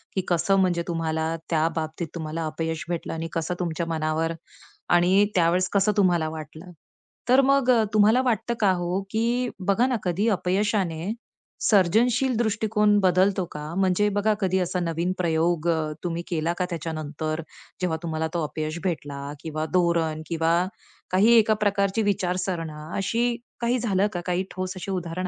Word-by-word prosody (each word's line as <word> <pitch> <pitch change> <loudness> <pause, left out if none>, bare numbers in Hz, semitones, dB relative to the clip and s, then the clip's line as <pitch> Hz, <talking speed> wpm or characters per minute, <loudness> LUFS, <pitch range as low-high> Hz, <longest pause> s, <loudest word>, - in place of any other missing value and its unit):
की 190 - +1
कसं 175 +3 +2
म्हणजे 175 -2 +2
तुम्हाला 160 -1 -1
त्या 160 -1 +2
बाबतीत 160 +1 -3
तुम्हाला 160 0 -4
अपयश 160 0 -3
भेटलं 170 -2 -3
आणि 165 0 -4
कसं 165 +2 -1
तुमच्या 170 -1 -2
मनावर 160 0 -1 0.6
आणि 180 +3 +5
त्यावेळेस 180 +1 +3
कसं 200 +1 +3
तुम्हाला 175 -5 +3
वाटलं. 155 +3 -9 0.6
तर 260 +2 +6
मग 275 -1 +3
अ, 230 -3 +4
तुम्हाला 215 +4 +5
वाटतं 235 -2 0
का 200 -3 +4
हो, 180 +1 -1
की 235 +3 0 0.2
बघा 230 +6 +3
ना 255 - 0
कधी 185 +4 0
अपयशाने, 190 -2 0 0.5
सर्जनशील 230 +6 +3
दृष्टिकोन 215 -2 +2
बदलतो 185 0 +3
का? 150 +2 -6
म्हणजे 190 +1 +2
बघा, 205 +1 +1
कधी 190 -2 +1
असा 180 0 -1
नवीन 170 +1 -1
प्रयोग 170 -1 +1
अ, 160 -2 0
तुम्ही 170 -1 -3
केला 170 -1 -1
का 180 - 0
त्याच्यानंतर 155 -1 -4 0.4
जेव्हा 165 -3 0
तुम्हाला 160 -1 -2
तो 170 -2 0
अपयश 155 +2 -4
भेटला 145 -6 -3 0.2
किंवा 155 0 -4
धोरण 170 -3 +1
किंवा 165 +2 +1 0.5
काही 200 +5 +5
एका 220 0 +5
प्रकारची 200 +1 +1
विचारसरणी 180 -6 -2
अशी 235 +4 0 0.3
काही 240 +1 +1
झालं 205 -3 +1
का? 175 - -3
काही 180 +1 0
ठोस 185 0 -4
अशी 185 +1 -5
उदाहरण 180 0 -3
180 Hz, 155 wpm, -25 LUFS, 165-200 Hz, 0.6 s, तर